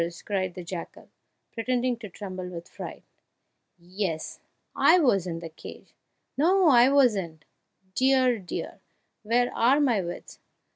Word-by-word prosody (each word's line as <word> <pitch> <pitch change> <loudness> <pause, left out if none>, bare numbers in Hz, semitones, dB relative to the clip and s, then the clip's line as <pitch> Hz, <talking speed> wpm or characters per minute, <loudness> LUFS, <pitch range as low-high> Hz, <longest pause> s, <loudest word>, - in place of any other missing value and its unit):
cried 185 -3 -2
the 180 - -7
jackal, 170 0 -8 0.4
pretending 245 +1 -1
to 225 -3 -10
tremble 185 -1 -7
with 170 -1 -8
fright; - - -9 0.7
"yes! 175 -2 -4 0.4
I - - +5
was 205 - +2
in 165 -1 -5
the 165 - -7
cage 160 - -12 0.4
no 355 +4 +4
I 245 -1 +6
wasn't 200 - +1 0.5
dear! 255 -2 +3
dear! 180 -3 -6 0.4
where 240 +3 +1
are 255 +5 +4
my 245 -9 +2
wits? 175 -1 -8
210 Hz, 130 wpm, -26 LUFS, 180-255 Hz, 0.7 s, I